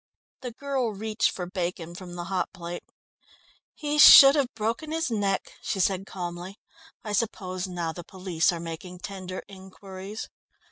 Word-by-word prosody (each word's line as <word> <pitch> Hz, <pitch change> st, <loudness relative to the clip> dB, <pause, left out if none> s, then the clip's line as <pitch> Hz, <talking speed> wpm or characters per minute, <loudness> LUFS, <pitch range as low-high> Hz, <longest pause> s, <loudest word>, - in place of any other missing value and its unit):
The 250 Hz, -2 st, -5 dB
girl 260 Hz, -2 st, -2 dB
reached 220 Hz, +2 st, 0 dB
for 180 Hz, -, -5 dB
bacon 175 Hz, -2 st, -4 dB
from 175 Hz, 0 st, -9 dB
the 175 Hz, -, -4 dB
hot 185 Hz, 0 st, -2 dB
plate. 175 Hz, -2 st, -6 dB, 0.9 s
"He 300 Hz, 0 st, -2 dB
should 275 Hz, -2 st, +11 dB
have 280 Hz, -4 st, +1 dB
broken 230 Hz, +8 st, -2 dB
his 325 Hz, -5 st, -1 dB
neck," 200 Hz, -3 st, -1 dB
she 195 Hz, -, -3 dB
said 190 Hz, +1 st, +1 dB
calmly. 180 Hz, +1 st, -6 dB, 0.5 s
"I 210 Hz, -2 st, -4 dB
suppose 185 Hz, -3 st, -2 dB
now 170 Hz, -3 st, -3 dB
the 175 Hz, -, -8 dB
police 180 Hz, -2 st, 0 dB
are 170 Hz, -, -4 dB
making 170 Hz, +2 st, -7 dB
tender 185 Hz, -2 st, -6 dB
inquiries?" 190 Hz, +1 st, -9 dB
190 Hz, 150 wpm, -26 LUFS, 180-220 Hz, 0.9 s, should